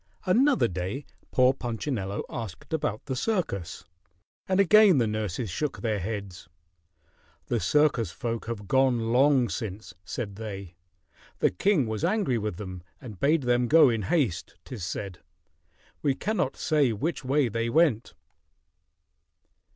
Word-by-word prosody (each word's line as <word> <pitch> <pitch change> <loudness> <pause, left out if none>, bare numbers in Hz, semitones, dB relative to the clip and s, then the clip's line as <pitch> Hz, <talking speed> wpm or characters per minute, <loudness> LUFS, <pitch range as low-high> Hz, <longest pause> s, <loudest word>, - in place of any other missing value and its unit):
Another 255 +9 +3
day 95 +10 -4 0.2
poor 130 0 +4
Punchinello 115 -5 -3
asked 115 - -7
about 110 -9 -2
the 130 - -3
circus, 125 - -2 0.6
and 190 0 +1
again 200 -2 +6
the 120 - +3
nurses 105 -1 -3
shook 150 - -3
their 110 -3 -1
heads. 95 -4 -6 1.0
"The 120 - -1
circus 150 -4 +2
folk 115 -1 -4
have 105 -4 -5
gone 120 -3 +2
long 135 -1 +4
since," 100 0 -6
said 100 +1 -5
they. 100 -5 -7 0.6
"The - - +2
king 155 - +2
was 110 -1 -4
angry 185 - +1
with 105 -5 -4
them 95 -3 -7 0.2
and 110 -7 -10
bade 150 +1 +2
them 120 0 +2
go 155 0 +7
in 115 -2 -1
haste, 110 - -1
'tis 115 -8 -7
said. 90 +1 -5 0.8
We 140 -3 +1
cannot 205 -8 -1
say 150 -6 +2
which 135 +7 -3
way 135 +1 +2
they 115 +1 -2
went." 140 - +2
120 Hz, 135 wpm, -27 LUFS, 105-145 Hz, 1.0 s, go